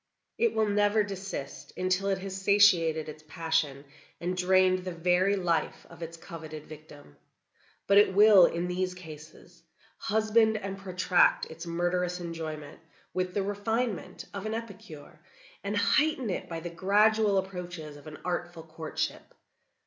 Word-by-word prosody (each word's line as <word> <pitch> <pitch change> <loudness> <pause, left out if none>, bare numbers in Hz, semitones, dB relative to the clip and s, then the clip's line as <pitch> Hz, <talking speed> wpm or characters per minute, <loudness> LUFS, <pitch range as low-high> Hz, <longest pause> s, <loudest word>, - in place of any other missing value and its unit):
It 465 -1 +2
will 220 - +3
never 205 +1 +3
desist 195 -8 -7
until 185 +1 0
it 195 -1 +1
has 190 0 -6
satiated 175 -6 +4
its 155 0 -9
passion, 160 -4 -1 0.3
and 180 +1 -2
drained 185 0 +3
the 185 0 -5
very 180 +3 +2
life 175 -4 -1
of - - -13
its 165 0 -7
coveted 155 -2 -9
victim. 150 - -14 0.7
But 200 0 +6
it 200 -2 +3
will, 205 -4 +8
in 170 +1 -2
these 180 0 -2
cases, 165 +1 -13 0.4
husband 220 +1 +2
and 195 -2 -5
protract 185 -2 +2
its 165 +2 -9
murderous 175 +1 -1
enjoyment 160 -3 -6 0.3
with 185 -1 -2
the 200 - +1
refinement 205 -1 -2
of 200 +1 -5
an 220 - -2
epicure, 195 -9 -9 0.4
and 200 +1 -2
heighten 250 +4 +2
it - - -4
by 165 -1 -5
the 175 0 -6
gradual 205 +3 +3
approaches 180 -5 -5
of 145 +2 -13
an 150 - -9
artful 175 -2 -3
courtship. 160 0 -5
180 Hz, 145 wpm, -29 LUFS, 165-200 Hz, 0.7 s, will